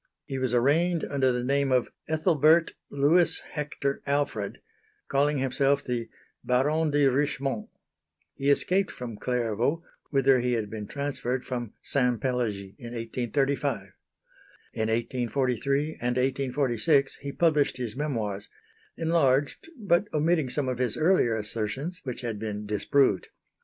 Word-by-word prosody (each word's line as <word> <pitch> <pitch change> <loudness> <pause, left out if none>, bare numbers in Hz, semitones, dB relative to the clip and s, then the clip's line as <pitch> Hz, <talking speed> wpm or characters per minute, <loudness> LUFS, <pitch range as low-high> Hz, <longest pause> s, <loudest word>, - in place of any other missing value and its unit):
He 135 -3 -4
was 130 -2 0
arraigned 155 +8 +2
under 135 -2 +1
the 125 0 -1
name 140 +1 +1
of 125 -1 +2 0.2
"Ethelbert 160 0 +3 0.2
Louis 150 +5 +3
Hector 145 -2 -3
Alfred," 140 -8 -1 0.5
calling 145 +2 +2
himself 135 +2 +1
the 120 -2 -3 0.3
"Baron 150 +6 +2
de 145 -1 +3
Richmont." 135 -3 0 0.6
He 140 +1 -1
escaped 185 +7 +2
from 120 -4 -7
Clairvaux, 125 +7 -1 0.3
whither 135 -2 +4
he 125 0 0
had 110 -3 -2
been 105 -2 -5
transferred 135 -3 -3
from 120 -4 -4
Saint 125 -4 +1
Pélagie, 110 -6 -2
in 120 -2 -8
1835. 125 +3 -1 0.9
In 110 0 -1
1843 125 +3 0 0.2
and 125 +1 0
1846 135 +1 +1
he 140 0 -6
published 150 -4 +2
his 120 -3 -4
memoirs 110 -9 -3 0.5
enlarged 145 - +1
but 195 -3 +2
omitting 155 -2 +1
some 135 +1 -1
of 125 -1 -2
his 125 -3 0
earlier 155 -9 +3
assertions, 115 - -4
which 125 -3 -4
had 115 -4 -4
been 105 -1 -4
disproved. 105 +2 +2
135 Hz, 130 wpm, -27 LUFS, 120-145 Hz, 0.9 s, whither